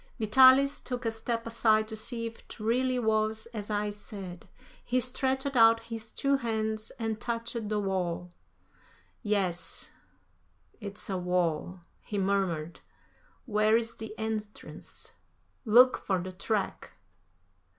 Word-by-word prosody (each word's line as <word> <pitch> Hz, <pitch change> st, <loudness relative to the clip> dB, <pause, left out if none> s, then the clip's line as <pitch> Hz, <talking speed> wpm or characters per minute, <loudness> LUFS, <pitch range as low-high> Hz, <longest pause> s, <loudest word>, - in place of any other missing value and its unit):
Vitalis 260 Hz, +5 st, +6 dB
took 250 Hz, -1 st, -4 dB
a 225 Hz, -, +1 dB
step 230 Hz, +1 st, -3 dB
aside 220 Hz, -1 st, +3 dB
to 220 Hz, -, -6 dB
see 230 Hz, +2 st, -3 dB
if 230 Hz, 0 st, -7 dB
it -, -, -14 dB
really 250 Hz, +4 st, +1 dB
was 220 Hz, -1 st, +1 dB
as 210 Hz, -2 st, -5 dB
I 210 Hz, 0 st, 0 dB
said. 195 Hz, -3 st, -9 dB, 0.4 s
He 250 Hz, +1 st, +1 dB
stretched 265 Hz, +2 st, 0 dB
out 230 Hz, -1 st, +7 dB
his 225 Hz, -1 st, -7 dB
two 275 Hz, +3 st, +1 dB
hands 220 Hz, -3 st, -2 dB
and 225 Hz, -2 st, -3 dB
touched 230 Hz, -2 st, -3 dB
the 210 Hz, -1 st, 0 dB
wall. 180 Hz, -3 st, -2 dB, 0.9 s
"Yes, 195 Hz, -6 st, -1 dB, 0.9 s
it's 200 Hz, 0 st, -6 dB
a 190 Hz, -2 st, -2 dB
wall," 180 Hz, 0 st, -1 dB, 0.2 s
he 210 Hz, -, -5 dB
murmured. 190 Hz, -5 st, 0 dB, 0.7 s
"Where 215 Hz, -1 st, +3 dB
is 230 Hz, 0 st, -3 dB
the 220 Hz, 0 st, -8 dB
entrance. 215 Hz, -1 st, -6 dB, 0.5 s
Look 245 Hz, +4 st, +6 dB
for 190 Hz, -, 0 dB
the 185 Hz, +1 st, -4 dB
track." 195 Hz, +2 st, -2 dB
220 Hz, 130 wpm, -29 LUFS, 200-230 Hz, 0.9 s, out